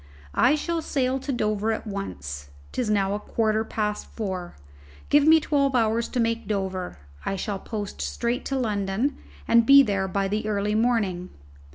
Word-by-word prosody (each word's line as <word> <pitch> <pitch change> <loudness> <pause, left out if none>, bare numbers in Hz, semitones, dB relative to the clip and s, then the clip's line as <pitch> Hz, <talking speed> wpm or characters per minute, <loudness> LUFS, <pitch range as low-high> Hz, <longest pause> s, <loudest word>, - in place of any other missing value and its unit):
"I 270 - +4
shall 335 +2 -2
sail 265 -3 0
to 275 - -4
Dover 215 -2 0
at 220 - -3
once. 75 - -6 0.2
'Tis 245 -4 -2
now 200 -2 +2
a 205 - -2
quarter 220 0 0
past 210 -1 -3
four. 190 -5 -5 0.5
Give 290 +1 +5
me 320 0 +8
twelve 280 -3 +1
hours 230 0 +2
to 250 - -3
make 230 0 0
Dover: 190 - -3 0.3
I 195 - -1
shall 195 +1 -3
post 205 -2 -5
straight 235 +1 -2
to 270 - -1
London 215 +2 -1 0.3
and 235 0 +6
be 275 +3 +8
there 195 -5 0
by 195 +1 0 0.2
early 210 -1 -1
morning. 215 -6 +1
215 Hz, 165 wpm, -25 LUFS, 195-250 Hz, 0.5 s, me